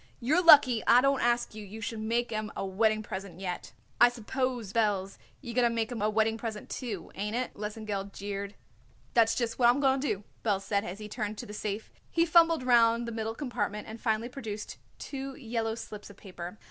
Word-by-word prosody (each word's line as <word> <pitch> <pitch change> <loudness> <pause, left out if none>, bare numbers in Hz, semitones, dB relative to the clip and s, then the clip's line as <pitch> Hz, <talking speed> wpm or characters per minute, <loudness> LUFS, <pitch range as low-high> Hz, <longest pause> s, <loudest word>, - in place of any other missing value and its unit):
"You're 305 +9 +2
lucky 275 -8 +8
I 245 - +8
don't 275 0 +3
ask 240 -1 +1
you 215 0 -8
you 205 +2 -9
should 225 0 -4
make 235 +2 -1
'em 215 -1 -3
a - - -2
wedding 215 +3 +1
present 190 -4 -7
yet." 180 -2 -5 0.3
"I 240 - +8
suppose, 245 -2 -3
Belz, 200 -4 0 0.2
you're 240 -4 -6
going 240 0 +3
to - - -3
make 230 0 -1
'em 230 -4 -4
a 210 - +2
wedding 220 +1 +1
present, 220 -2 -6
too, 215 -10 -5
ain't 210 +3 -3
it?" 255 +1 -2
Lesengeld 210 -1 -4
jeered. 200 0 -5 0.6
"That's 225 -1 +4
just 230 0 -2
what 240 -1 +6
I'm 250 +3 +3
going 270 -1 +3
to 290 - -1
do," 205 -4 -2 0.2
Belz 205 -4 +1
said 200 0 0
as 185 -1 -6
he 210 0 -7
turned 215 -1 -4
to - - -6
the 210 - -9
safe. 210 0 -4 0.2
He 335 0 +2
fumbled 330 -3 +5
round 235 -1 +4
the - - -3
middle 225 0 -3
compartment 210 -6 -3
and 220 +1 -9
finally 225 0 0
produced 220 -5 -7 0.2
two 270 -1 -6
yellow 225 -3 -2
slips 210 -2 -8
of 200 - -14
paper. 180 0 -8
225 Hz, 210 wpm, -29 LUFS, 210-240 Hz, 0.6 s, lucky